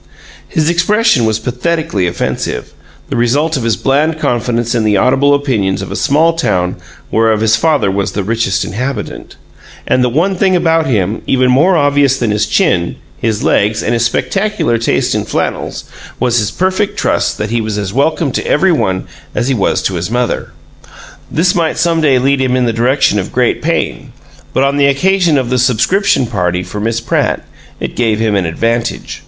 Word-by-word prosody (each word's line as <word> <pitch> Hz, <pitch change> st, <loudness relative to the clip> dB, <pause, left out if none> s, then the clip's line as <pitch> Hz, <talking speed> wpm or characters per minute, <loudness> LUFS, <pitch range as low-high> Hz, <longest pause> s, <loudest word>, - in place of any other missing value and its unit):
His 155 Hz, -3 st, 0 dB
expression 175 Hz, -, +2 dB
was 110 Hz, -1 st, +1 dB
pathetically 125 Hz, -, -1 dB
offensive, 85 Hz, -, -3 dB, 0.4 s
the -, -, -3 dB
result 145 Hz, +7 st, +1 dB
of 135 Hz, -, -2 dB
his 115 Hz, -2 st, +1 dB
bland 150 Hz, -, +1 dB
confidence 120 Hz, -3 st, -1 dB
in 115 Hz, -2 st, +1 dB
the 105 Hz, -2 st, +2 dB
audible 135 Hz, +7 st, +3 dB
opinions 105 Hz, -10 st, -1 dB
of 95 Hz, -, -7 dB
a -, -, -4 dB
small 155 Hz, +8 st, +2 dB
town 90 Hz, -, -1 dB, 0.3 s
whereof 110 Hz, -1 st, +2 dB
his 110 Hz, 0 st, +3 dB
father 140 Hz, -3 st, +1 dB
was 100 Hz, 0 st, -2 dB
the 100 Hz, -, -2 dB
richest 95 Hz, -3 st, 0 dB
inhabitant 125 Hz, +7 st, -5 dB, 0.5 s
and 125 Hz, -, +2 dB
the 125 Hz, -, +2 dB
one 170 Hz, +10 st, +1 dB
thing 185 Hz, 0 st, +2 dB
about 165 Hz, -2 st, +2 dB
him, 105 Hz, -4 st, 0 dB
even 130 Hz, -1 st, +2 dB
more 165 Hz, +8 st, +4 dB
obvious 145 Hz, -2 st, +2 dB
than 120 Hz, -4 st, -1 dB
his 105 Hz, 0 st, 0 dB
chin, 85 Hz, -1 st, +1 dB, 0.2 s
his 110 Hz, -2 st, -1 dB
legs, 105 Hz, +2 st, +1 dB
and 115 Hz, -, 0 dB
his 115 Hz, -1 st, +1 dB
spectacular 195 Hz, -, 0 dB
taste 115 Hz, -, 0 dB
in -, -, -1 dB
flannels, -, -, -3 dB, 0.4 s
was 120 Hz, -1 st, +2 dB
his 105 Hz, -, 0 dB
perfect 195 Hz, +2 st, -1 dB
trust -, -, 0 dB
that 105 Hz, +1 st, -3 dB
he 120 Hz, -1 st, 0 dB
was 110 Hz, -1 st, -3 dB
as 100 Hz, -2 st, -3 dB
welcome 145 Hz, +2 st, +1 dB
to -, -, -3 dB
every 185 Hz, +5 st, +3 dB
one 95 Hz, -, 0 dB, 0.3 s
as 120 Hz, -, 0 dB
he -, -, +2 dB
was 105 Hz, -6 st, 0 dB
to 95 Hz, -, -1 dB
his 85 Hz, +1 st, -3 dB
mother. 120 Hz, +1 st, -1 dB, 0.8 s
This 175 Hz, +3 st, +1 dB
might 165 Hz, -2 st, 0 dB
some 165 Hz, -1 st, +1 dB
day 140 Hz, -4 st, +3 dB
lead 135 Hz, +2 st, +1 dB
him 130 Hz, -1 st, +1 dB
in 125 Hz, -1 st, +1 dB
the 115 Hz, -, 0 dB
direction 120 Hz, -1 st, +2 dB
of 95 Hz, -, -4 dB
great -, -, +1 dB
pain, -, -, -2 dB, 0.4 s
but 130 Hz, -, +1 dB
on 140 Hz, +1 st, +1 dB
the 140 Hz, -1 st, +4 dB
occasion 175 Hz, +2 st, +2 dB
of 125 Hz, -2 st, -1 dB
the 130 Hz, -, +1 dB
"subscription 130 Hz, -, +2 dB
party" 90 Hz, -5 st, -1 dB
for 105 Hz, -, -7 dB
Miss 115 Hz, +2 st, -1 dB
Pratt 115 Hz, -, -1 dB, 0.3 s
it -, -, -5 dB
gave 110 Hz, -3 st, 0 dB
him 110 Hz, -2 st, +1 dB
an 95 Hz, -4 st, 0 dB
advantage. 115 Hz, +7 st, -2 dB
125 Hz, 190 wpm, -13 LUFS, 110-155 Hz, 0.8 s, more